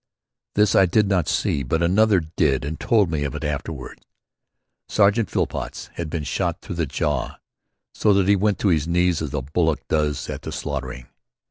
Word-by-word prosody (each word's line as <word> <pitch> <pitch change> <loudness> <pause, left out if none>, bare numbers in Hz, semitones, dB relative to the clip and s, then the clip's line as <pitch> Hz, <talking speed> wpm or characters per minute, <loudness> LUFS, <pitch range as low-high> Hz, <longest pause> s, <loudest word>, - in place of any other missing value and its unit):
This 105 -2 +3
I 95 - +5
did 105 +4 +2
not 90 -5 +1
see, 70 - 0
but 80 +6 -1
another 100 +3 +4
did 80 -3 0
and 80 +3 -5
told 105 -7 +2
me 75 -3 -1
of 70 - -3
it - - -5
afterward. 75 -1 -5 0.9
Sergeant 105 0 +3
Phillpots - - -3
had 85 -2 -5
been 80 -1 -3
shot - - -2
through 85 - -7
the 85 -3 0
jaw 70 0 -2 0.6
so 105 - +2
that 95 -1 +2
he 100 - +5
went 100 +1 +1
to 100 - +3
his 80 -3 +1
knees 90 -1 +2
as 80 -4 -3
a 70 - -2
bullock 80 +3 0
does 75 -2 0
at - - -5
the - - -6
slaughtering. 65 -3 -5
85 Hz, 190 wpm, -23 LUFS, 75-100 Hz, 0.9 s, I